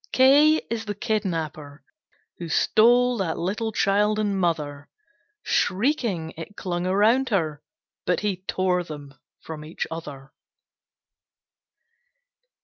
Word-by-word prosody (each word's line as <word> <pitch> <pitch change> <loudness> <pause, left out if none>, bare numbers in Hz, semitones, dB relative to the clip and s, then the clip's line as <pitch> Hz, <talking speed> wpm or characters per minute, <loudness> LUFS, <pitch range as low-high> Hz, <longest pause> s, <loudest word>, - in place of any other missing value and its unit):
K 290 +4 +5
K - - -32
is 225 -1 -2
the 205 -1 -4
Kidnapper, 160 -9 -3 0.6
who 170 -2 -6
stole 245 +7 +4
That 185 -4 -1
little 210 +5 -2
child 210 +1 +2
and 205 -2 0
mother 150 -6 -2 0.5
Shrieking, 195 - 0
it 165 +5 -9
clung 175 -1 -3
around 220 +8 +3
her, 155 -8 -1 0.5
but 180 - +1
He 205 -3 -1
tore 180 -1 +1
them 145 -4 -9 0.3
from 155 -2 -7
each 155 +2 -4
other. 145 -4 -8
185 Hz, 115 wpm, -24 LUFS, 160-215 Hz, 0.6 s, K